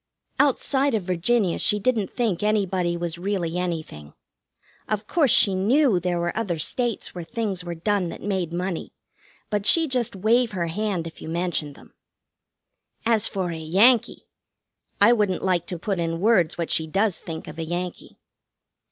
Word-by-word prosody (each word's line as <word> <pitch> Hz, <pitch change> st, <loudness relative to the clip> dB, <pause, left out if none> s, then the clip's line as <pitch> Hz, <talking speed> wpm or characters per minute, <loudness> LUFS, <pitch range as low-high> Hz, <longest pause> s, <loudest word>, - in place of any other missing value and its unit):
Outside 275 Hz, -1 st, +2 dB
of 210 Hz, -, -1 dB
Virginia 185 Hz, +2 st, +1 dB
she 210 Hz, -1 st, +2 dB
didn't 215 Hz, -2 st, 0 dB
think 225 Hz, -8 st, -1 dB
anybody 190 Hz, -5 st, 0 dB
was 170 Hz, -1 st, -4 dB
really 180 Hz, -3 st, -2 dB
anything. 160 Hz, -, -5 dB, 0.7 s
Of 215 Hz, 0 st, -1 dB
course, 300 Hz, +2 st, +2 dB
she 200 Hz, -2 st, +5 dB
knew 220 Hz, +3 st, +3 dB
there 175 Hz, 0 st, -1 dB
were 175 Hz, 0 st, -2 dB
other 200 Hz, -7 st, -1 dB
states 235 Hz, -, -2 dB
where 175 Hz, -, -6 dB
things 200 Hz, -1 st, -3 dB
were 175 Hz, -1 st, -5 dB
done 190 Hz, +1 st, 0 dB
that -, -, -9 dB
made 190 Hz, -4 st, -1 dB
money, 180 Hz, 0 st, -4 dB, 0.6 s
but 205 Hz, -1 st, -1 dB
she'd 325 Hz, -4 st, +4 dB
just 245 Hz, -5 st, 0 dB
wave 225 Hz, +4 st, +2 dB
her 175 Hz, -3 st, -1 dB
hand 185 Hz, 0 st, -2 dB
if 165 Hz, -, -9 dB
you -, -, -7 dB
mentioned 165 Hz, -4 st, -2 dB
them. -, -, -18 dB, 1.1 s
As 225 Hz, -2 st, +3 dB
for 185 Hz, -3 st, -3 dB
a 165 Hz, -, -5 dB
Yankee! 200 Hz, +10 st, +3 dB, 0.7 s
I 210 Hz, +4 st, +7 dB
wouldn't 205 Hz, -5 st, 0 dB
like 180 Hz, -3 st, +1 dB
to 180 Hz, -, -4 dB
put 190 Hz, +2 st, -2 dB
in 165 Hz, 0 st, -2 dB
words 190 Hz, -5 st, +3 dB
what 170 Hz, -1 st, -3 dB
she 160 Hz, -, +1 dB
does 195 Hz, +3 st, 0 dB
think 160 Hz, -1 st, -7 dB
of 155 Hz, -, -9 dB
a -, -, -2 dB
Yankee. 175 Hz, +2 st, -5 dB
185 Hz, 170 wpm, -24 LUFS, 170-215 Hz, 1.1 s, I